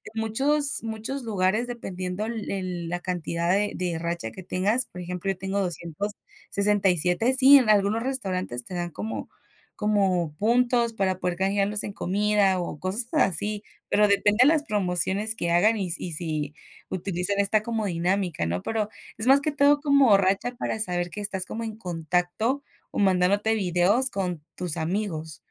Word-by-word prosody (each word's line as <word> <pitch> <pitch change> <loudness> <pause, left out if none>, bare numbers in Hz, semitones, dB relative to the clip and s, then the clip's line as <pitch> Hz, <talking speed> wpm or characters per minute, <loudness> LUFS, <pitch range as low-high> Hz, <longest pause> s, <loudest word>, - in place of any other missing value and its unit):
muchos 280 +8 +3
muchos 225 +4 -5
lugares, 210 +2 0
dependiendo 185 -4 -5
el 225 -2 -5
el 180 -3 -4
la 175 0 -2
cantidad 170 -1 -2
de 205 +2 +1
de 175 -3 -2
racha 170 -8 -3
que 185 - -10
tengas, 200 +7 +1
por 180 - -10
ejemplo, 180 +2 -3
yo 185 - -6
tengo 190 +1 -2
267. 195 - -1
Sí, 270 +2 +8
en 245 -5 +2
algunos 210 +2 +3
restaurantes 185 - -2
te - - -8
dan 175 -1 -3
como 220 +6 -5 0.5
como 195 -7 +1
puntos 235 +1 +2
para 190 -3 -1
poder 180 -1 -1
canjearlos 200 +2 +1
en 200 - -5
comida 200 0 +1
o 160 -4 -5
cosas 200 +6 -2
así, 205 - +1 0.3
pero 210 0 +4
depende 205 +2 +2
de 260 - +7
las 305 -1 +3
promociones 200 - -1
que 170 -5 -2
hagan, 215 +6 +4
y 185 -4 -3
si 180 - -3
y - - -6
si 155 -2 -3 0.4
utilizan 185 +1 -2
esta 205 +1 +2
como 225 -1 -2
dinámica, 175 - -1
¿no? 90 +2 -3
Pero 215 -2 -2 0.3
es 225 - -2
más 275 +1 +7
que 300 +2 -1
todo 290 0 +4
como 280 -8 +5
racha 195 +6 0
para 220 - -3
saber 175 -3 0
que 210 - -5
estás 190 -3 -2
como 230 +4 -5
en 220 -1 -6
contacto 180 - -1 0.3
o - - -8
mandándote 195 +2 +2
videos 200 +5 +3
con 180 -7 -3
tus 180 -4 -1
amigos. 160 -3 -3
200 Hz, 165 wpm, -25 LUFS, 180-220 Hz, 0.5 s, Sí